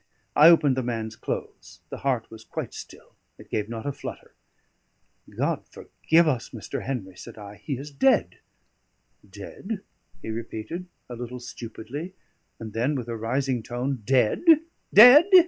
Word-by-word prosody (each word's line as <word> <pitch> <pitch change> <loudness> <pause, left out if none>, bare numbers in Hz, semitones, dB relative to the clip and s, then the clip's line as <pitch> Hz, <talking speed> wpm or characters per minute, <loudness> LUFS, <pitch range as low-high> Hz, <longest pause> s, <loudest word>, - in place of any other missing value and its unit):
I 155 +3 +9
opened 150 -6 +5
the - - +1
man's 115 -2 -4
clothes; - - -6
the - - -5
heart 130 -5 -1
was 110 0 -11
quite - - -6
still, - - -11 0.2
it - - -16
gave 105 0 -2
not 115 -1 -6
a 145 - -1
flutter. - - -9 1.0
"God - - -2
forgive 165 +1 +1
us, 130 -6 -1
Mr. 115 -4 -6
Henry!" 100 -9 -4
said 95 - -11
I. 105 -1 -10
"He 140 -4 -4
is 145 +3 -8
dead." 170 - +2 0.9
"Dead?" 190 - -7 0.4
he 110 - -4
repeated, 115 +9 -6 0.2
a 120 - -7
little 125 +1 -7
stupidly; 125 - -8 0.4
and 110 -2 -8
then, 125 +6 0
with 120 -3 -4
a 115 - -3
rising 125 +3 -1
tone, 125 +2 -3
"Dead? 125 - +2 0.5
dead?" 250 - +9
125 Hz, 150 wpm, -25 LUFS, 110-145 Hz, 1.0 s, I